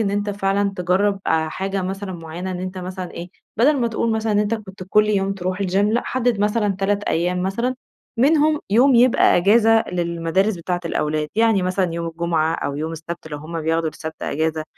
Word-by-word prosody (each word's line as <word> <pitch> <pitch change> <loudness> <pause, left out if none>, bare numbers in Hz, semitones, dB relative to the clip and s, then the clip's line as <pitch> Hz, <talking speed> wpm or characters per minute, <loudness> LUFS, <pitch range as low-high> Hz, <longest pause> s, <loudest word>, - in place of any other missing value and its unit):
إن 200 -3 +1
أنتَ 205 0 -1
فعلًا 200 0 0
تجرب، 190 +3 +1
آآ 160 0 +1
حاجة 195 +3 -3
مثلًا 190 +1 -4
معيّنة 170 +2 -6
إن 180 -1 -4
أنتَ 185 0 -5
مثلًا 185 0 -6
إيه، 175 +1 -7 0.3
بدل 285 +7 +4
ما 235 - +1
تقول 230 0 -1
مثلًا، 220 0 0
إن 205 - +2
أنتَ 210 +2 +1
كنت 195 -3 -9
كل 210 +2 +4
يوم 195 -2 +1
تروح 185 0 -3
الgym 185 0 -1
لأ، 210 +4 +2
حدِّد 245 -4 0
مثلًا 210 -1 +1
3 205 +1 0
أيام 180 +2 0
مثلًا، 235 +7 -1 0.4
منهم 300 +3 +3
يوم 250 +6 +5
يبقى 240 +1 +5
أجازة 225 +4 +4
للمدارس 175 +3 0
بتاعة 175 +1 -3
الأولاد، 150 -2 -1
يعني 225 -4 +3
مثلًا 185 -1 0
يوم 170 0 -3
الجمعة 165 -1 0
أو 140 -3 -3
يوم 160 +2 -3
السبت، 165 0 -7
لو 150 - -6
هم 160 +2 -6
بياخدوا 160 +1 0
السبت 160 +1 -8
أجازة، 160 +1 -1
190 Hz, 195 wpm, -21 LUFS, 170-210 Hz, 0.4 s, يوم